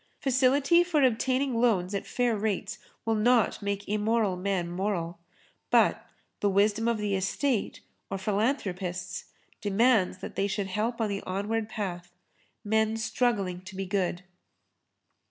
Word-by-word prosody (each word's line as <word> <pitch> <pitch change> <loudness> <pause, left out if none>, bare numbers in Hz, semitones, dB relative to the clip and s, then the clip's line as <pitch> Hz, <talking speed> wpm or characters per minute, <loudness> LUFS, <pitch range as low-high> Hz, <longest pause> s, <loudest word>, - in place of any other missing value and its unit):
Facility 275 +6 +4
for 325 -5 +1
obtaining 255 0 +1
loans 200 -6 +2
at 200 - -3
fair 245 -2 +1
rates 205 -1 -2 0.3
will 225 - +2
not 225 +1 +3
make 200 0 -3
immoral 210 -1 +1
men 185 -1 -1
moral. 175 -2 -2 0.5
But - - +3 0.3
the 205 - +2
wisdom 210 +3 +2
of 235 -1 +2
the 210 -1 -1
Estate 205 +5 -1 0.3
or 195 - -2
philanthropists 190 -4 -2 0.4
demands 205 -2 +3
that - - -8
they 200 - +1
should 200 0 -2
help 215 +5 -2
on 220 - +2
the 200 0 -2
onward 210 +4 -2
path, 180 -5 -5 0.5
men 220 +1 +1
struggling 210 -6 0
to 190 +1 -11
be 195 0 -3
good. 185 -2 -1
210 Hz, 135 wpm, -28 LUFS, 190-230 Hz, 0.5 s, Facility